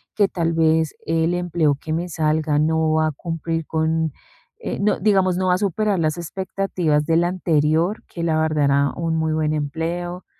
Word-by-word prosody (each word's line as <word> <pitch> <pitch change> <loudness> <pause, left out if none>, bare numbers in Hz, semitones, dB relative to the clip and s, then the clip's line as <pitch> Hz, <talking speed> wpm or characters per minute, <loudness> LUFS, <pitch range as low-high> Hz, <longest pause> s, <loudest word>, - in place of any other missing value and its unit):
que 205 -2 +4
tal 165 -3 -1
vez 160 -1 +2
el 165 +1 +1
empleo 170 -5 +1
que 155 - -4
me 175 +2 -2
salga 155 -1 0
no 160 0 +2
va 155 0 +2
a - - -1
cumplir 165 +1 -4
con, 160 0 0 0.5
eh, - - -4
no, 210 - +1
digamos, 190 -2 +2
no 185 0 0
va 180 - +4
a - - 0
superar 200 0 0
las 155 +1 0
expectativas 175 -3 -1
del 165 +2 +2
anterior 170 +1 +1
que, 170 - -6
la 160 -2 +1
verdad 155 -2 +1
era 140 0 +2
un 165 -1 -1
muy 160 0 0
buen 155 -1 0
empleo, 170 +4 -3
165 Hz, 185 wpm, -21 LUFS, 155-175 Hz, 0.5 s, que